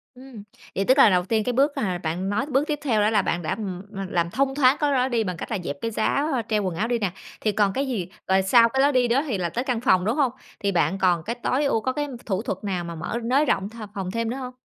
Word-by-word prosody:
Ừm, 250 -4 -11 0.3
vậy 195 - 0
tức 260 +5 +4
là 270 - +8
đầu 180 -2 +2
tiên 220 +2 +1
cái 250 - -1
bước 275 +4 +3
hà 185 -4 -1
bạn 175 +3 -3
nói 210 +7 0
bước 285 +1 0
tiếp 295 -2 -2
theo 230 -7 +2
đó 210 - +3
là 215 -2 +3
bạn 175 - -1
đã, 155 - -2
ừm, 190 -5 -5
ừm, 195 -2 -5
làm 170 -2 0
thông 270 +7 0
thoáng 270 -1 +4
cái 295 -1 +1
đó 255 -2 +2
đi 235 -3 0
bằng 180 -4 -4
cách - - -7
là 220 - 0
dẹp 145 - -4
cái 230 - -2
giá 275 +7 0 0.2
treo 210 -2 +1
quần 185 -3 -2
áo 215 +7 -1
đi 240 -1 0
nè, 200 -4 -1 0.3
thì 215 - +1
còn 200 -1 +1
cái 275 +4 -1
gì? 210 -9 -2 0.2
Rồi 190 0 +3
sau 230 +5 +5
cái 265 +3 +1
lối 285 +1 +4
đi 255 -2 +3
đó 250 +4 +2
thì 230 -7 -1
là 175 -2 -1
tới 240 +9 -2
căn 250 -4 -1
phòng, 185 -7 +3
đúng 220 +4 +1
hông? 280 -5 +2 0.3
Thì 200 - 0
bạn 175 0 +1
còn 175 -3 +2
cái 230 +6 -3
tối 255 +4 0
ưu 225 -5 +1
có 260 - -1
cái 290 +2 -2 0.2
thủ 195 -2 -1
thuật 195 -4 -4
nào 185 -4 -2
mà 170 0 -6
mở 170 +8 -4
nới 265 +6 +2
rộng 195 -8 0
th 225 - -16 0.2
phòng 190 -3 -4
thêm 230 +2 -2
nữa 250 - -3
hông? 255 -1 -6
220 Hz, 305 wpm, -24 LUFS, 190-260 Hz, 0.3 s, là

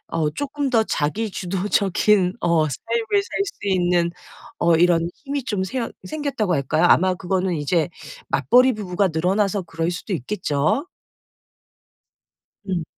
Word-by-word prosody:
어 155 -2 0
쪼끔 285 - -3
더 225 -2 +3
자기 205 +9 -1
주도적인 190 +1 +1
어 165 -3 +2
삶을 440 - -1
살 400 - -5
수 270 - -6
있는 175 -2 +2 0.5
어 170 -1 +4
이런 170 0 +3 0.2
힘이 280 -1 -3
좀 200 -5 -1
새 235 +3 -3 0.2
생겼다."고 270 - -1
할까요? 140 +3 +1
아마 185 +1 +4
그거는 185 -1 -1
이제 155 +3 0 0.4
맞벌이 250 - +4
부부가 195 -2 0
늘어나서 190 +4 0
그럴 165 0 -3
수도 180 +4 -5
있겠죠. 170 - -1 1.8
음. 175 -3 -1
185 Hz, 260 characters per minute, -22 LUFS, 170-220 Hz, 1.8 s, 어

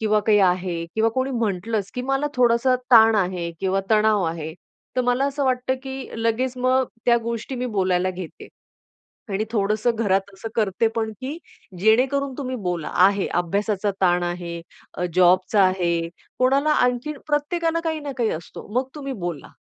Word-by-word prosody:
किंवा 215 -1 +2
काही 210 -2 +5
आहे 180 -2 +1
किंवा 220 +1 +3
कोणी 260 +3 -1
म्हटलंच, 215 -3 -2
की 250 - -3
"मला 270 +3 0
थोडासा 245 0 +3 0.2
ताण 225 -1 +8
आहे." 180 -3 -1
किंवा 190 0 +1
"तणाव 215 -1 +4
आहे." 160 -1 -4 0.4
तर - - +3
मला 245 +2 +2
असं 280 0 -2
वाटतं 255 0 +1
की 265 -1 -6
लगेच 245 +3 0
मग 255 +1 +2 0.2
त्या 240 -1 +5
गोष्टी 235 +2 -4
मी 250 0 -2
बोलायला 185 -4 +1
घेते. 180 -2 -9 0.8
आणि 200 +2 -1
थोडंसं 215 +2 +1
घरात 200 -3 0
असं 220 +4 -7
करते 215 0 +1
पण, 220 -1 -1
की 275 +5 -4 0.4
जेणेकरून 260 +7 +2
तुम्ही 260 -2 -3
बोला. 175 -5 -3
आहे 195 +1 +4
अभ्यासाचा 200 +3 -1
ताण 175 -1 +3
आहे, 175 -1 -4 0.3
अ, 180 - -2
जॉबचा 185 +3 +4
आहे, 170 -3 +1 0.3
कोणाला 275 +4 +3
आणखीन 250 +1 +1
प्रत्येकाला 330 +3 0
काही 320 -1 -1
ना 290 -1 -5
काही 235 -3 +1
असतो, 160 +1 -7
मग 255 +1 +1
तुम्ही 275 -2 -5
बोला, 175 -5 -5
220 Hz, 160 wpm, -23 LUFS, 185-255 Hz, 0.8 s, ताण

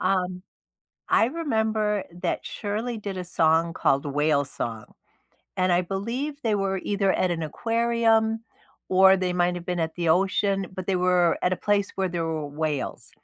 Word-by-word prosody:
Um, 185 -1 0 0.7
I - - +5
remember 220 - 0 0.2
that 175 - 0
Shirley 225 +3 -3
did 200 -3 -5
a 180 - -3
song 165 -1 +2
called 140 -2 +1
Whale 145 0 +1
Song, 115 -4 -5 0.7
and 185 0 +3
I 175 +1 +3
believe 230 - -3
they 220 -3 +1
were 195 -1 0
either 200 -2 +1
at 185 - +1
an 165 -2 -2
aquarium, 225 +4 +1 0.5
or 190 +1 +6
they 185 -1 -1
might 175 0 +2
have 175 - -8
been 180 -1 -1
at 160 0 -2
the 170 -1 -1
ocean, 195 +3 +2
but 185 -1 -6
they 190 -2 +1
were 180 -1 +3
at 180 - +2
a 185 - +1
place 205 -1 0
where 190 -1 0
there 170 -2 -2
were 155 -2 -3
whales, 150 -2 -3
185 Hz, 170 wpm, -25 LUFS, 170-210 Hz, 0.7 s, or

